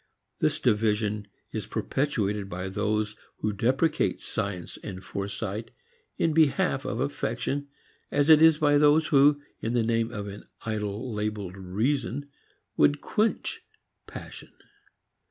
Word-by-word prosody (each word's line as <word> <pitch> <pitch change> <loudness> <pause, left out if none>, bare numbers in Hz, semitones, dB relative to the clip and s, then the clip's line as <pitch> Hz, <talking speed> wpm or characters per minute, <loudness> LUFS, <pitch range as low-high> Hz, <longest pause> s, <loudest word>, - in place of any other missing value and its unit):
This - - +1
division 105 -1 +1 0.2
is - - -4
perpetuated 105 -8 -1
by 90 +1 -4
those 105 +2 -1 0.2
who 105 - -1
deprecate 130 - +1
science 90 -4 -4
and 95 -2 -7
foresight 100 +3 -4 0.5
in 160 - +2
behalf 155 -3 +3
of - - -2
affection 145 +1 -2 0.4
as 145 0 +2
it 155 -1 +8
is 160 -1 +7
by 145 -1 +4
those 150 +2 +5
who 145 0 +5 0.2
in 115 - -1
the 120 -2 +2
name 115 0 +1
of 105 -3 -5
an 100 0 -8 0.2
idol 110 +2 -3
labeled 105 -3 -3
reason 125 +9 -1 0.5
would 145 0 +4
quench 215 +8 0 0.5
passion. - - -9
110 Hz, 125 wpm, -27 LUFS, 100-145 Hz, 0.5 s, it